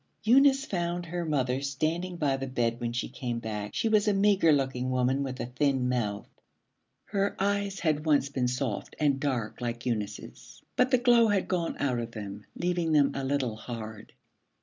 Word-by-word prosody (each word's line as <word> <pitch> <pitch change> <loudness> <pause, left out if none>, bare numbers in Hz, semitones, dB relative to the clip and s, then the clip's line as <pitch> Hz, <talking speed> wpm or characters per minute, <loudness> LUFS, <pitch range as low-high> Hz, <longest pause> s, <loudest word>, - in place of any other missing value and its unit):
Eunice 275 +4 +5
found 175 -3 -2
her 175 +1 -3
mother 130 -3 0
standing 160 +6 -2
by 145 -5 +1
the 135 0 -4
bed 120 -2 -1
when 120 -1 -1
she 120 - -2
came 125 -2 -4
back. 105 -3 -4
She - - +1
was 215 -1 +3
a 205 - +3
meagre 195 -4 +4
looking 130 -3 0
woman 130 +2 +1
with 130 -2 -4
a - - -2
thin 130 +1 0
mouth. 110 -5 -1 0.8
Her 200 -1 -1
eyes 200 0 -1
had 155 -2 +1
once 145 -3 +3
been 130 -3 -1
soft 125 -3 -3
and 145 -3 +2
dark 130 -6 -2
like 120 -1 -4
Eunice's, 110 -5 -5
but 250 +1 +3
the 255 - +4
glow 240 -2 +5
had 205 -3 +1
gone 175 -3 -1
out 125 -4 0
of 115 0 -5
them, 100 -1 -7
leaving 175 -2 0
them 145 -2 +4
a 135 - -3
little 130 -4 -1
hard. 110 -1 -8
140 Hz, 185 wpm, -28 LUFS, 120-175 Hz, 0.8 s, Eunice